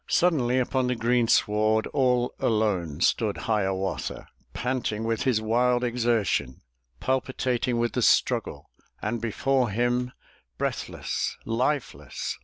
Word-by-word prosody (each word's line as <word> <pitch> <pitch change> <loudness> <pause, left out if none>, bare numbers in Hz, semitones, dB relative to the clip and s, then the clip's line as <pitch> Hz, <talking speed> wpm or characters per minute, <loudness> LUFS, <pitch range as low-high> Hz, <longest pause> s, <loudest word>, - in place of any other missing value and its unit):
Suddenly 150 -9 +2
upon 130 0 +1
the 125 - 0
greensward 110 -2 +2
All 125 -3 +2
alone 95 -9 0
stood 105 0 +2
Hiawatha, 95 -3 -2 0.2
Panting 120 -4 -2
with 115 -1 -1
his 125 -5 +3
wild 120 +3 +2
exertion, 115 - 0 0.4
Palpitating 130 -2 -1
with 120 -1 0
the - - 0
struggle; - - +1 0.3
And 120 - -3
before 125 +2 +1
him, 120 +3 0 0.5
breathless, - - -3
lifeless. 130 +5 -2
120 Hz, 105 wpm, -26 LUFS, 110-125 Hz, 0.5 s, his